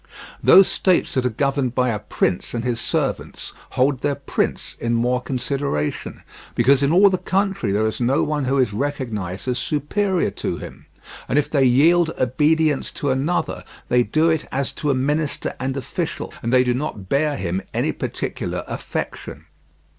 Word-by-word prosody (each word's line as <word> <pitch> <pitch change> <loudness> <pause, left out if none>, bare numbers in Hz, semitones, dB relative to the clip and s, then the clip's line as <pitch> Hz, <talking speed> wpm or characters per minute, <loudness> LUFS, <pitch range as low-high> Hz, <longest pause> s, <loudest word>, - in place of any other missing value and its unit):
Those 195 0 +8
states 185 -2 +1
that 130 -1 +1
are - - 0
governed 135 +1 -1
by 125 -1 +2
a 110 -3 -1
prince 95 0 -1
and 115 - -2
his 120 -2 -1
servants - - -2 0.2
hold 130 0 +2
their 145 -1 0
prince 140 - -2
in 115 0 0
more 125 +2 +1
consideration, 130 - -3 0.3
because 130 +3 +4
in 140 +1 +2
all 195 +3 +6
the 185 - 0
country 195 - 0
there 105 +2 +1
is 110 +3 -2
no 125 +3 +2
one 150 -2 -1
who 135 +2 +1
is 125 -6 +2
recognized 110 -7 -3
as 125 -1 0
superior 180 - 0
to - - -3
him, - - -10 0.4
and 135 - +1
if 150 - +1
they 140 -3 +3
yield 160 +7 +4
obedience 150 +4 +2
to 145 - -1
another 140 +7 -1 0.3
they 125 - +4
do 155 +8 +2
it 160 -2 +1
as 135 0 -1
to 150 - -3
a 135 - +3
minister 145 +3 -1
and 130 +1 -2
official, 135 - -4
and 115 - -2
they 125 0 +5
do 125 -1 +1
not 125 -8 -4
bear 145 +5 +1
him 95 -2 -2
any - - 0
particular - - -4
affection. - - -5
135 Hz, 175 wpm, -21 LUFS, 120-150 Hz, 0.4 s, Those